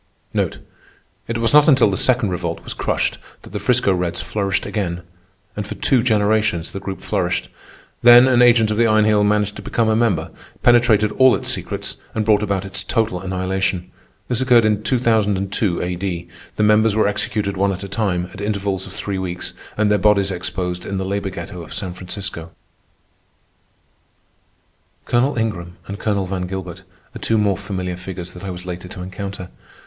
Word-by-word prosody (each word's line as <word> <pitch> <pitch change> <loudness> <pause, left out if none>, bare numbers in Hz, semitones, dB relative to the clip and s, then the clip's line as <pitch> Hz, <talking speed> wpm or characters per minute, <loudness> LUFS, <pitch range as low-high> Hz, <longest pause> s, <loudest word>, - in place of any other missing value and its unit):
It 115 - -2
was 115 +2 0
not 150 0 +7
until 130 -8 +5
the - - 0
Second 120 -1 +2
Revolt 85 -2 -3
was - - -5
crushed, - - -1 0.2
that - - -13
the 105 - -3
'Frisco 105 -1 +2
Reds 90 -2 -2
flourished 95 +1 -1
again. 90 -4 -3 0.5
And 105 -1 -4
for - - -6
two 130 -3 +2
generations 105 -6 +1
the 95 - -5
Group 95 -1 -6
flourished. 90 -4 -1 0.5
Then 120 +1 +8
an 125 -2 +4
agent 115 -3 +5
of 105 - -1
the 115 0 +4
Iron 110 -1 +4
Heel 105 -1 +3
managed 105 0 +1
to - - -7
become 115 -2 0
a 110 - +3
member, 110 -9 +1 0.3
penetrated 115 -3 +4
all 130 +2 +5
its - - -3
secrets, - - -4 0.2
and 110 -1 0
brought 105 -1 +4
about 100 -2 -1
its 95 +1 -2
total 110 -6 0
annihilation. 95 -1 -2 0.4
This 125 0 0
occurred 120 -3 +5
in 105 -1 +2
2002 105 -5 +1
A.D. 90 -1 -3 0.3
The 105 - +1
members 105 0 +4
were 110 - +3
executed 105 0 -1
one 100 +1 +1
at 95 0 -5
a - - -5
time, 100 -4 -1
at 100 - -8
intervals 100 -2 -2
of 95 - -10
three 100 -1 -3
weeks, 90 -1 -4 0.2
and 105 0 +2
their 105 - +3
bodies 100 0 +3
exposed 90 0 -3
in 100 - -4
the 95 - -2
labor 100 0 -2
ghetto 90 -1 -7
of 80 - -9
San 95 -3 -4
Francisco. 90 -2 -6 2.6
Colonel 120 +3 +1
Ingram 90 -6 -3
and 100 +1 -7
Colonel 100 -3 0
Van 90 -1 -3
Gilbert 95 -1 -6 0.3
are - - -6
two 115 - +1
more 105 -2 +2
familiar 95 -2 -4
figures 90 -1 -7
that 90 - -11
I 100 - -4
was 90 0 -7
later 90 0 -6
to 90 0 -8
encounter. 95 0 -6
100 Hz, 180 wpm, -20 LUFS, 90-110 Hz, 2.6 s, Then